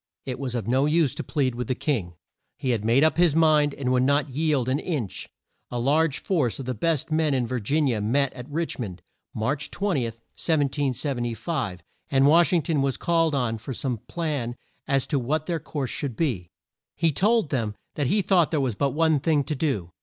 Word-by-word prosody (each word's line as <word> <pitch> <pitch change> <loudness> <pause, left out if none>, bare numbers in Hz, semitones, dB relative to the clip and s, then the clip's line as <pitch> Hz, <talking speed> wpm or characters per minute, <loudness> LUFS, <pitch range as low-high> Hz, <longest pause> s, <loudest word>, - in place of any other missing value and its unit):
It 130 -2 -4
was 130 -3 -3
of 115 -5 -3
no 130 +4 +3
use 155 -3 +2
to - - -5
plead 135 -5 0
with 120 -1 -4
the 130 - 0
king. 110 - -2 0.4
He 130 - -1
had 110 -4 -1
made 120 +6 +4
up 160 - +3
his 170 -4 +4
mind 155 -3 +4
and 130 -2 -1
would 125 -1 +3
not 140 +1 +2
yield 145 -3 +1
an 130 +3 +1
inch. 140 - -4 0.4
A 125 - -4
large 145 +4 +2
force 150 - 0
of 135 - -6
the 130 - -2
best 155 +5 -1
men 155 -2 +2
in 125 -2 +1
Vir 125 +2 -2
gin 145 +8 +1
i 135 - +2
a 110 -3 -1
met 135 +6 +1
at 125 +1 -9
Rich 165 +1 -3
mond, 95 -7 -6 0.3
March 135 +6 -1
20, 185 -11 0
1775, 130 - -2 0.3
and 135 0 +4
Wash 165 +4 +5
ing 170 -4 +2
ton 150 -1 0
was 135 -1 0
called 165 -3 +2
on 115 -4 0
for 130 +3 -6
some 125 -3 -2
plan 145 -8 -2 0.3
as 135 -1 +2
to 145 - 0
what 150 +5 -1
their 170 -1 -1
course 140 -4 -4
should 135 -5 -3
be. 110 - -1 0.5
He 165 +1 +2
told 210 +4 +2
them 115 -6 -1 0.2
that 145 -3 -1
he 205 +8 +2
thought 180 -5 +3
there 155 - 0
was 130 -4 0
but 140 +5 0
one 160 -2 +3
thing 150 0 +2
to 150 - -3
do. 130 - -1
140 Hz, 215 wpm, -25 LUFS, 125-155 Hz, 0.5 s, Wash